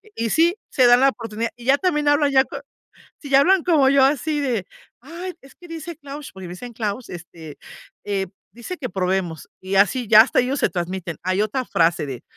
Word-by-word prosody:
y 230 0 -2
sí, 335 +3 +3 0.2
se 255 - +3
dan 245 0 +6
la 275 - +6
oportunidad, 230 -2 -4
y 240 -1 -14
ya 270 +2 +4
también 300 -4 0
hablan 290 0 +3
ya 265 -1 +5
con 280 +1 -8 0.6
si 285 - -9
ya 275 0 +6
hablan 375 +3 +3
como 305 -7 +4
yo 275 -1 +4
así 295 +2 0
de, 245 -9 -1 0.4
ay, 340 +7 -7
es 270 - -18
que 350 - -15
dice 330 0 -8
Claus, 285 -1 -9
porque 190 -1 -10
me 175 - -7
dicen: 240 +7 -9
"Claus", 220 +1 -4
este, 165 -3 -10 0.5
eh, 195 -2 -2 0.3
dice 240 +10 -7
que 260 -5 -5
probemos, 180 -3 -2
y 190 +1 -4
así 210 +5 +2
ya 215 +1 +9
hasta 225 - +2
ellos 260 +3 0
se - - +2
transmiten. 175 -2 -4
Hay 185 +2 0
otra 230 +5 -2
frase 165 -4 +1
de: 130 -4 -7
245 Hz, 215 wpm, -21 LUFS, 190-290 Hz, 0.6 s, ya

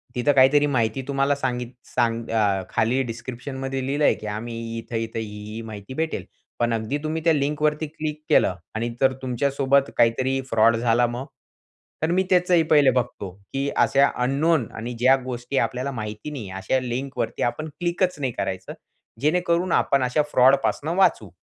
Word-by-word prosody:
तिथं 125 +4 +2
काहीतरी 135 +2 +5
माहिती 120 -2 0
तुम्हाला 140 0 +1
सांगित 125 -3 -3 0.2
सांग 115 -1 +1
अ, 105 -4 +1
खाली 125 +4 +1
डिस्क्रिप्शनमध्ये 130 +3 -5
लिहिलं 145 +2 0
आहे - - +5
की 105 0 -8
आम्ही 115 +3 -5 0.2
इथं-इथं, 115 0 -4
ही-ही 105 +1 -7
माहिती 110 +1 -8
भेटेल 160 - -2 0.3
पण 120 -1 +1
अगदी 115 +6 -1
तुम्ही 160 +1 -2
त्या 165 - +4
लिंकवरती 150 +2 0
क्लिक 155 0 -5
केलं 90 - +4 0.2
आणि 120 +2 -1
जर 135 0 +4
तुमच्यासोबत 135 +2 +1
काहीतरी 130 +3 +2
फ्रॉड 115 +1 +4
झाला 120 +1 +2
मग? 120 +3 -5 0.8
तर 160 - +1
मी 185 +1 +3
त्याचंही 180 -2 +4
पहिले 145 -3 +6
बघतो 120 -6 -2 0.2
की 135 +1 -1
अशा 140 +1 +4
अननोन 140 0 +2
आणि 115 +2 -5
ज्या 130 +2 +6
गोष्टी 125 +1 -4
आपल्याला 125 +4 0
माहिती 110 +3 -6
नाही 115 -9 -6
अशा 130 +7 +1
लिंकवरती 130 +2 -3
आपण 155 +6 -2
क्लिकच 175 -1 0
नाही 130 -3 -1
करायचं, 95 -1 -4 0.5
जेणेकरून 170 +3 +1
आपण 140 -1 +2
अशा 125 +4 +2
फ्रॉड 130 +2 +6
पासून 155 - -1
वाचू. 175 - +3
130 Hz, 160 wpm, -24 LUFS, 115-145 Hz, 0.8 s, पहिले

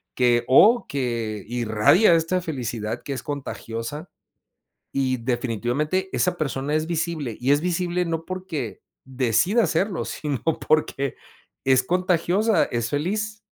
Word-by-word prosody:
que 120 -1 +3
o 215 - +6
que 115 -6 -3
irradia 120 - +4
esta 165 +3 +1
felicidad 120 -7 -4
que 140 - -4
es 130 - -5
contagiosa. 140 -1 -5 0.9
Y 130 -2 +1
definitivamente 125 - -1
esa 180 -1 +1
persona 140 -1 -2
es 155 +1 0
visible 160 -7 -2
y 135 +3 +3
es 145 +2 +2
visible 180 0 0
no 165 -1 -3
porque 180 - -5 0.2
decida 130 - +2
hacerlo, 180 +2 0 0.2
nuevas 145 -4 -2 0.2
generaciones 140 -3 +1 0.5
es 130 -1 +4
contagiosa, 180 - +2
es 120 -1 -3
feliz. 210 +8 -2
145 Hz, 125 wpm, -24 LUFS, 125-180 Hz, 0.9 s, o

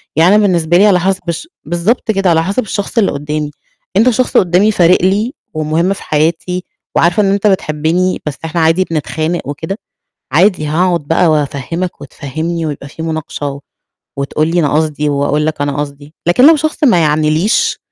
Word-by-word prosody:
يعني 170 +6 +5
أنا 215 - +5
بالنسبة 170 -2 +2
لي 200 - +5
على 185 -3 +4
حسب 190 +1 0
الش 170 - -4 0.2
بالضبط 175 +8 0
كده 195 -3 +1
على 165 -1 +3
حسب 200 +8 -1
الشخص 205 +3 -4
اللي 215 -4 +3
قدّامي، 150 +1 -3 0.5
أنت 225 +5 +5
شخص 250 +1 +1
قدّامي 185 +4 +3
فارق 180 -2 +4
لي 205 +7 +1 0.2
ومهم 155 +4 0
في - - -10
حياتي 165 +4 -1 0.3
وعارفة 175 +5 +3
إن 195 - +2
أنت 200 +1 +1
بتحبني، 180 0 0
بس 150 - -2
إحنا 165 +1 -1
عادي 165 +3 +3
بنتخانق 160 +2 -2
وكده، 160 +7 -4 0.5
عادي 175 +2 +3
هاقعد 170 +3 +1
بقى 165 +4 +1
وأفَهِّمَك 155 +4 -2
وَتفَهِّمْنِي 160 +4 -4
ويبقى 145 -2 -5
في 155 - -10
مناقشة 145 -3 -4 0.6
وتقول 145 +3 -1
لي 170 +2 +1
أنا 150 -4 +1
قصدي 150 -1 0
وأقول 145 +1 0
لك 155 -2 -2
أنا 145 -1 -1
قصدي، 145 +1 -6
لكن 250 +11 +5
لو 325 - +7
شخص 310 +1 -2
ما 240 -11 +5
يعنيليش 155 - +1
165 Hz, 175 wpm, -14 LUFS, 150-190 Hz, 0.6 s, لو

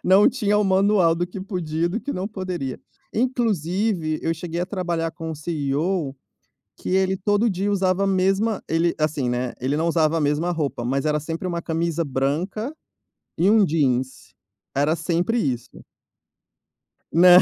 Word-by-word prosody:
Não 190 +3 +6
tinha 210 -5 +1
o 210 - +2
manual 190 -3 +4
do 175 +1 -1
que 180 +2 -8
podia 170 -4 -2
e - - 0
do 210 +7 -2
que 285 - -4
não 185 +3 -3
poderia. 180 - -4 0.3
Inclusive, 205 - 0
eu 165 - +1
cheguei 170 +1 -4
a 180 - -1
trabalhar 175 -4 -2
com 165 -1 -6
o 160 - -4
CEO, 150 0 -1 0.6
que - - -6
ele 190 0 +2
todo 205 +4 +2
dia 195 +1 -1
usava 190 -1 +2
a - - +1
mesma 195 +3 +1
ele, 165 +1 +2
assim, 155 -4 0
né, 125 0 -1
ele 135 +4 0
não 160 +2 0
usava 160 -1 +2
a - - -1
mesma 150 +4 +1
roupa, 150 -8 -2
mas 135 +2 0
era 150 0 +2
sempre 165 +4 -4
uma 170 -1 -2
camisa 165 0 -1
branca 160 - -1 0.7
e 175 +4 +4
um 215 0 +6
jeans, 130 -5 -1 0.4
era 145 +4 +2
sempre 175 +7 0
isso. 125 - -3 1.3
Nã 175 +1 +8
170 Hz, 170 wpm, -23 LUFS, 155-195 Hz, 1.3 s, Nã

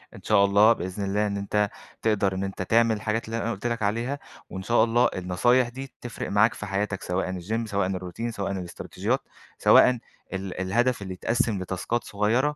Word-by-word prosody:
إن - - -12
شاء 100 - +4
الله 105 +3 +6
بإذن 95 0 -5
الله، 105 +2 +1
إن 100 0 -2
أنت 105 +1 0 0.3
تقدر 100 -3 +2
إن 95 - -2
أنت 95 -1 -4
تعمل 115 +3 +3
الحاجات 110 +2 -2
اللي 115 +1 -3
أنا 115 - -1
قُلت 110 +2 -3
لك 120 -1 -2
عليها، 115 +7 -1 0.3
وإن 95 - -6
شاء 115 +2 +4
الله 120 +2 +3
النصايح 120 +8 +2
دي 135 +2 -8
تِفرِق 120 -2 -5
معاك 105 +3 +4
في - - -7
حياتك 100 0 -2
سواءً 90 +1 -1
الgym 110 +6 -2
سواءً 100 -3 0
الroutine 95 +5 -4
سواءً 100 -3 -3
الإستراتيجيات، 90 -3 -3 0.4
سواءً - - +7 0.4
ال 95 -1 -4
الهدف 120 +5 +1
اللي 95 -1 -5
يتقسِّم 115 +1 0
لتاسكات 95 +6 -2
صغيرة 115 +8 +1
105 Hz, 185 wpm, -26 LUFS, 95-115 Hz, 0.4 s, سواءً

